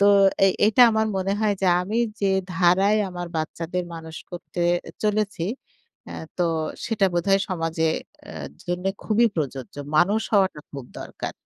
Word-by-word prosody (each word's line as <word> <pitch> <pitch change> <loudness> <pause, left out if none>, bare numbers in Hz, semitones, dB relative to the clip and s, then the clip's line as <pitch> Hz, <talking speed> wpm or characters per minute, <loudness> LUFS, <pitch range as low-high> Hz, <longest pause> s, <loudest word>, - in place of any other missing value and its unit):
তো 200 - +6 0.4
এই 190 - +4
এটা 235 +3 +6
আমার 220 0 +1
মনে 190 +1 0
হয় 210 -2 +2
যে, - - +3 0.2
আমি 215 +5 -2 0.2
যে 195 - +3 0.3
ধারায় 190 +4 +4
আমার 175 -1 -5
বাচ্চাদের 165 +3 -3
মানুষ 160 -1 -8
করতে 175 0 -5 0.4
চলেছি। 210 -4 0 0.6
অ্যাঁ - - -7
তো 175 - +3 0.4
সেটা 210 -4 +2
বোধহয় 195 +3 +2
সমাজে 165 -2 0 0.4
আ - - -9 0.3
জন্যে 180 +2 -1
খুবই 230 +2 +3
প্রযোজ্য। 135 -5 -4 0.2
মানুষ 205 +7 +4
হওয়াটা 190 -6 +2
খুব 140 -3 -7 0.2
দরকার। - - -6
185 Hz, 145 wpm, -24 LUFS, 165-205 Hz, 0.6 s, তো